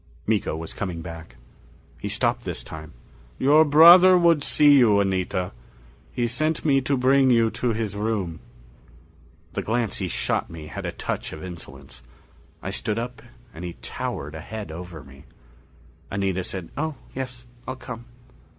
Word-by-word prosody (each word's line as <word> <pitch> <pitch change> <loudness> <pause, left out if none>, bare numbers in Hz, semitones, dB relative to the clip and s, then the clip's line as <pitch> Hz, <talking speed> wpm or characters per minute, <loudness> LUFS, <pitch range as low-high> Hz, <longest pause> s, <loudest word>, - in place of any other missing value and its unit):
Miko 105 -7 0
was 80 0 -5
coming 85 -5 -4
back. 80 -6 -9 0.6
He 100 - -4
stopped 120 +3 0
this 90 -5 -4
time. 80 -1 -9 0.4
"Your 150 +4 +6
brother 170 +5 +8
would 170 -4 +4
see 145 -2 +5
you, 105 -5 +5
Anita. 95 -1 -1 0.6
He 120 - -1
sent 155 +8 -1
me 135 -3 +4
to 140 +1 0
bring 130 +1 +4
you 115 -2 +4
to 120 -2 -1
his 110 -2 -3
room." 100 -6 -2 1.1
The - - -2
glance 115 -1 -1
he - - -1
shot - - -1
me 80 -2 -9
had - - -6
a - - -2
touch - - -4
of 80 - -8
insolence. 85 -7 -10 0.6
I 95 - -3
stood 105 +2 -1
up 120 +1 -5 0.3
and 80 - -9
he 90 -1 -5
towered 75 +2 -4
a 80 - -7
head 105 0 -7
over 85 -2 -8
me. 70 -1 -16 0.8
Anita 95 -2 -1
said, 90 -2 -6
"Oh 155 +1 -2 0.2
yes. 125 -2 -6 0.2
I'll 130 - -3
come." 120 -2 -8
110 Hz, 160 wpm, -24 LUFS, 90-130 Hz, 1.1 s, brother